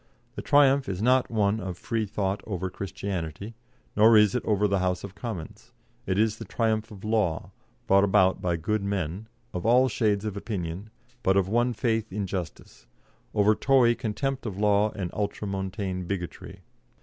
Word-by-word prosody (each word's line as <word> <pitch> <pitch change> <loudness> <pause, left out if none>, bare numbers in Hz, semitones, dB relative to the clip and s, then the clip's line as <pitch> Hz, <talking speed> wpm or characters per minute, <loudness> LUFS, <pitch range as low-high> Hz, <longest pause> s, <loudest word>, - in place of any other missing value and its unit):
The - - -6
triumph 140 -2 +4
is 95 -2 -3
not 125 +4 +3
one 105 -1 +1
of 90 -3 -5
Freethought 105 -3 -2
over 95 -3 -3
Christianity, 95 +1 -5 0.4
nor 110 +1 +7
is 105 -2 +5
it 125 - -1
over 105 -1 +2
the 100 -1 +1
House 90 -1 -1
of 100 -2 -7
Commons; 95 -8 -7 0.3
it 95 - 0
is 110 0 +1
the - - -5
triumph 110 -1 -1
of 100 -2 -12
law, 105 -7 0 0.3
brought 100 +1 +4
about 95 -2 +3
by 90 -3 0
good 105 +6 -1
men 100 0 -3 0.3
of 90 - -4
all 125 +3 +5
shades 105 -2 0
of 105 -2 -3
opinion, 100 -1 -5 0.3
but 95 -3 +2
of 95 -2 +2
one 120 +4 +1
faith 110 -1 -1
in 100 +1 -2
justice 90 -9 -7 0.5
over 105 0 +4
Tory 125 0 +4
contempt 125 +3 -3
of 100 -3 -5
law 105 0 +3
and 95 -4 -4
Ultramontane 95 -2 -3
bigotry. 90 -3 -6
100 Hz, 165 wpm, -26 LUFS, 95-110 Hz, 0.5 s, nor